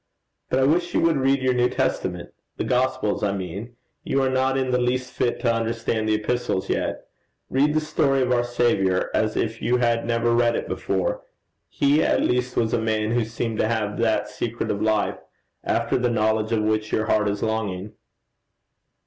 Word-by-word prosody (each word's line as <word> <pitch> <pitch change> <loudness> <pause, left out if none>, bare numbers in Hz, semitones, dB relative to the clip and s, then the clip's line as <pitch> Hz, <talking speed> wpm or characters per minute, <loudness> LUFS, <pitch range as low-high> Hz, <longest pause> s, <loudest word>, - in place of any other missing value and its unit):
But - - +1
I 135 - +3
wish 175 +5 +1
you - - +4
would 165 -2 +3
read 135 0 +2
your 130 0 +3
New 125 0 +2
Testament - - -2 0.2
the - - -1
Gospels 125 -3 0
I 100 -1 0
mean: 100 +5 -6 0.3
you 135 - 0
are 130 - +1
not 130 +1 +1
in 130 -1 0
the 125 0 +2
least 125 +1 -1
fit 120 - 0
to 120 -3 +2
understand 115 -1 -1
the 110 - +3
Epistles 115 -2 -2
yet. - - -2 0.5
Read 145 +3 +2
the - - +4
story 135 -3 +1
of 125 - -1
our 120 -1 +3
Saviour 115 -6 +1
as 110 -1 +1
if 115 0 -2
you 125 - +2
had 120 -1 +1
never 120 0 +1
read 120 0 +3
it - - -3
before. - - -2 0.5
He 145 +2 +2
at - - +2
least 125 0 0
was 115 -1 +1
a - - +1
man 110 -1 0
who 120 0 +2
seemed 115 0 -4
to - - +2
have 110 -2 -2
that 115 -1 +1
secret 120 0 -3
of 100 - -3
life 110 -1 +1 0.4
after - - 0
the 125 0 +1
knowledge 110 -1 +1
of 110 -2 +1
which 110 0 0
your 110 - +1
heart 105 -1 +2
is 100 0 -3
longing.' 105 -2 -2
115 Hz, 195 wpm, -23 LUFS, 110-130 Hz, 0.5 s, you